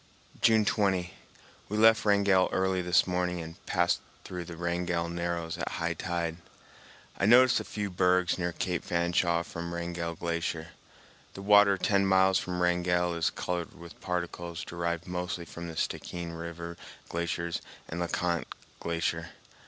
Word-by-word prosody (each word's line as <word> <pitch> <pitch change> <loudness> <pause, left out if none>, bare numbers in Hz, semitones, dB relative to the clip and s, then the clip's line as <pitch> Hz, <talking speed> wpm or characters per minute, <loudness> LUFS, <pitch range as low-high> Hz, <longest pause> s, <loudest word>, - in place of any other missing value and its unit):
June 110 -2 +5
20. 95 -5 +1 0.6
We 105 - -2
left 110 0 +6
Wrangell 100 -2 +4
early 95 0 +1
this 90 0 +4
morning 90 -1 -1
and 80 +3 -9
passed 85 -1 +2 0.2
through 90 -1 -6
the 85 -1 -8
Wrangell 85 0 -1
Narrows 85 -1 -3
at - - -3
high - - -1
tide. 85 -2 -2 0.8
I 100 - +3
noticed 125 +2 +7
a - - -4
few 105 -2 -4
bergs 90 0 +3
near 90 0 0
Cape 90 0 -2
Fanshawe 85 0 +1
from 85 0 -6
Wrangell 85 -1 -3
Glacier. 85 -1 -3 0.7
The 95 - -7
water 105 -1 +6
ten 100 +1 +2
miles 95 0 +4
from 90 -1 -2
Wrangell 90 0 +2
is 85 -1 +1
colored 90 -2 -4
with 85 0 -12
particles 85 -1 -3
derived 85 -1 -3
mostly 90 -1 -3
from 85 +1 -8
the 80 - -7
Stickeen 85 -1 -3
River 85 +1 -6 0.3
glaciers 85 0 -2 0.3
and 80 - -5
Le 85 - 0
Conte 85 -1 -1 0.3
Glacier. 85 -1 -2
85 Hz, 150 wpm, -29 LUFS, 85-90 Hz, 0.8 s, noticed